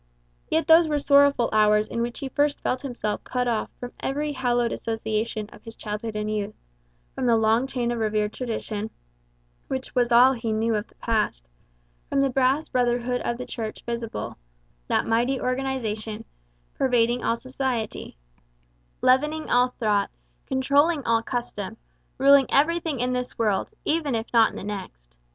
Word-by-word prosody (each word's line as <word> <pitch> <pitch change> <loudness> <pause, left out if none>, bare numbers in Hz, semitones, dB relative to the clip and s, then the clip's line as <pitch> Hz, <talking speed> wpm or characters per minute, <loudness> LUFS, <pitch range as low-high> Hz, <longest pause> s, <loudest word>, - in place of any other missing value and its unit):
Yet 320 +1 +1
those 325 0 +7
were 300 -1 +1
sorrowful 280 -3 +4
hours 210 0 +4
in 235 - -3
which 235 0 -3
he 270 - -3
first 290 +2 +1
felt 255 - -1
himself 240 -6 -3
cut 250 -1 -1
off 230 -3 0
from 245 0 -6
every 295 +2 -2
hallowed 245 -3 0
association 220 -1 -2
of - - -15
his 225 -1 -10
childhood 210 +1 -5
and 210 0 -2
youth; 210 0 -3 0.6
from 255 - -2
the 230 -1 +5
long 225 +3 +2
chain 245 -3 -1
of 240 - -2
revered 215 -1 0
tradition, 220 -3 -4 0.8
which 260 -1 -4
was 245 -1 +2
all 250 +3 +7
he 230 -3 -3
knew 225 +1 +1
of 210 +1 -2
the - - -26
past; 210 - -1 0.6
from 275 - +1
the 275 -1 +2
vast 270 +4 +1
brotherhood 245 0 +1
of 235 - -2
the 250 - -5
Church 220 -2 -6
visible 235 -1 -4 0.5
that - - +1
mighty 240 +4 +1
organization, 230 -4 -2 0.5
pervading 245 -2 +2
all 230 - +2
society, 255 - -4 0.9
leavening 300 +5 +2
all 245 +1 +5
thought, 210 -5 0 0.4
controlling 285 +4 +2
all 230 0 +3
custom, 225 -4 -4 0.4
ruling 275 0 +6
everything 320 0 +2
in 250 +1 0
this 250 0 -3
world, 210 -4 0
even 305 -5 0
if 225 0 -2
not 230 -1 +6
in - - -12
the - - -6
next. 185 - -7
240 Hz, 160 wpm, -25 LUFS, 220-265 Hz, 0.9 s, those